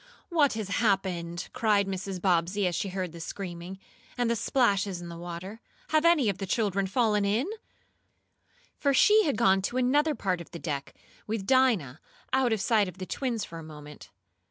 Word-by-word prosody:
"What 310 Hz, -6 st, +3 dB
has 220 Hz, -3 st, -4 dB
happened?" 185 Hz, -5 st, 0 dB
cried 215 Hz, -5 st, +2 dB
Mrs. 190 Hz, -1 st, -4 dB
Bobbsey, 180 Hz, +2 st, +1 dB
as 180 Hz, -, 0 dB
she 195 Hz, +3 st, -2 dB
heard 185 Hz, -2 st, -3 dB
the 170 Hz, -, -10 dB
screaming, 180 Hz, +1 st, -6 dB, 0.4 s
and 240 Hz, -1 st, +1 dB
the -, -, +2 dB
splashes 200 Hz, -6 st, +1 dB
in 175 Hz, 0 st, -8 dB
the 170 Hz, -, -7 dB
water. 175 Hz, +6 st, -7 dB, 0.3 s
"Have 310 Hz, +1 st, +2 dB
any 335 Hz, -8 st, +5 dB
of 200 Hz, -, -1 dB
the 195 Hz, -, -4 dB
children 200 Hz, -2 st, 0 dB
fallen 210 Hz, -1 st, +2 dB
in?" 210 Hz, +7 st, +1 dB, 1.3 s
For 280 Hz, -2 st, +2 dB
she 430 Hz, +5 st, +6 dB
had 280 Hz, -7 st, 0 dB
gone 195 Hz, -4 st, +4 dB
to 240 Hz, +6 st, -2 dB
another 290 Hz, +5 st, +2 dB
part 185 Hz, -6 st, -1 dB
of 170 Hz, -, -11 dB
the 170 Hz, -, -8 dB
deck, 145 Hz, -4 st, -5 dB, 0.3 s
with 215 Hz, -2 st, -3 dB
Dinah, 220 Hz, -, +2 dB, 0.3 s
out 260 Hz, -2 st, +3 dB
of 220 Hz, -, +1 dB
sight 210 Hz, 0 st, +3 dB
of 180 Hz, 0 st, -9 dB
the 185 Hz, -, -5 dB
twins 235 Hz, -2 st, -2 dB
for 165 Hz, -, -9 dB
a -, -, -9 dB
moment. 150 Hz, -1 st, -11 dB
200 Hz, 185 wpm, -28 LUFS, 175-240 Hz, 1.3 s, she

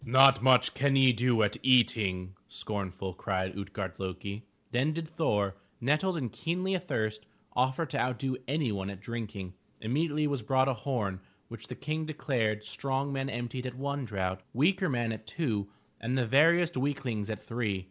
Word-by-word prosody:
*'Not 135 Hz, +2 st, +7 dB
much 125 Hz, -1 st, +5 dB
can 140 Hz, 0 st, +2 dB
ye 130 Hz, -2 st, +6 dB
do 120 Hz, -1 st, +3 dB
at 105 Hz, 0 st, +1 dB
eating!" 100 Hz, -7 st, +3 dB
scornful, 95 Hz, -2 st, -4 dB
cried 95 Hz, 0 st, -2 dB
Ut'gard 100 Hz, -2 st, -5 dB
lo'ki. 100 Hz, +2 st, -4 dB, 0.3 s
Then 135 Hz, +6 st, +2 dB
did 165 Hz, 0 st, -4 dB
Thor, 105 Hz, -, 0 dB, 0.2 s
nettled 155 Hz, +8 st, +1 dB
and 125 Hz, -8 st, -2 dB
keenly 185 Hz, -, -1 dB
athirst, 110 Hz, -12 st, -2 dB, 0.3 s
offer 130 Hz, +6 st, +2 dB
to 135 Hz, -, -3 dB
outdo 130 Hz, +1 st, 0 dB
anyone 115 Hz, -10 st, -1 dB
at 100 Hz, -2 st, -7 dB
drinking. 105 Hz, -4 st, -5 dB, 0.3 s
Immediately 150 Hz, +6 st, 0 dB
was 140 Hz, -4 st, 0 dB
brought 130 Hz, +4 st, +3 dB
a 135 Hz, -, +2 dB
horn 110 Hz, -6 st, -2 dB, 0.3 s
which 115 Hz, -1 st, -9 dB
the -, -, -6 dB
King 155 Hz, +2 st, -3 dB
declared 115 Hz, -8 st, -1 dB
strong 140 Hz, +1 st, -2 dB
men 135 Hz, 0 st, -1 dB
emptied 120 Hz, +1 st, -3 dB
at 125 Hz, -, -6 dB
one 140 Hz, +1 st, -2 dB
draught, 95 Hz, -5 st, -2 dB
weaker 185 Hz, +7 st, +3 dB
men 120 Hz, -4 st, 0 dB
at 110 Hz, 0 st, -7 dB
two 110 Hz, -12 st, -1 dB, 0.3 s
and 125 Hz, +3 st, -1 dB
the 125 Hz, -, +2 dB
veriest 165 Hz, +7 st, +4 dB
weaklings 130 Hz, -6 st, -1 dB
at 110 Hz, -, -3 dB
three. 115 Hz, -5 st, -1 dB
125 Hz, 165 wpm, -30 LUFS, 105-140 Hz, 0.3 s, Not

